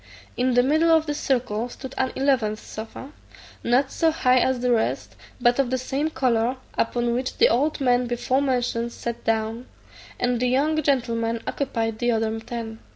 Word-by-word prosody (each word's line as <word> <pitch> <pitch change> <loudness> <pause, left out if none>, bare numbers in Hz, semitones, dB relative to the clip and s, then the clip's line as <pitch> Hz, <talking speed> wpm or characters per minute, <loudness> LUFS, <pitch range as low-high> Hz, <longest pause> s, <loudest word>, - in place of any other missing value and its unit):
In 250 0 +1
the 245 - +5
middle 310 +5 +3
of 320 -1 +4
this 295 -1 -3
circle 245 -3 -1
stood 265 +1 -9
an 260 - 0
eleventh 255 -6 +1
sofa, 225 +6 -9 0.5
not 265 +3 +2
so 325 - +2
high 255 -5 +3
as 260 0 +1
the 250 0 +1
rest, 230 -2 0 0.2
but 245 +1 +3
of 270 -3 +2
the 260 - 0
same 270 +4 -2
colour, 245 -4 +1 0.2
upon 240 +1 0
which 255 +2 -3
the - - +5
old 290 +7 +1
man 250 -2 +2
before 245 +2 0
mentioned 245 -3 -1
sat 235 0 -5
down, 225 +2 -1 0.5
and 245 -1 +1
the 250 - +1
young 300 +5 +2
gentlemen 230 -5 0
occupied 225 -5 -2
the 240 - +1
other 225 0 -1
ten. 225 -1 -6
245 Hz, 175 wpm, -24 LUFS, 230-265 Hz, 0.5 s, the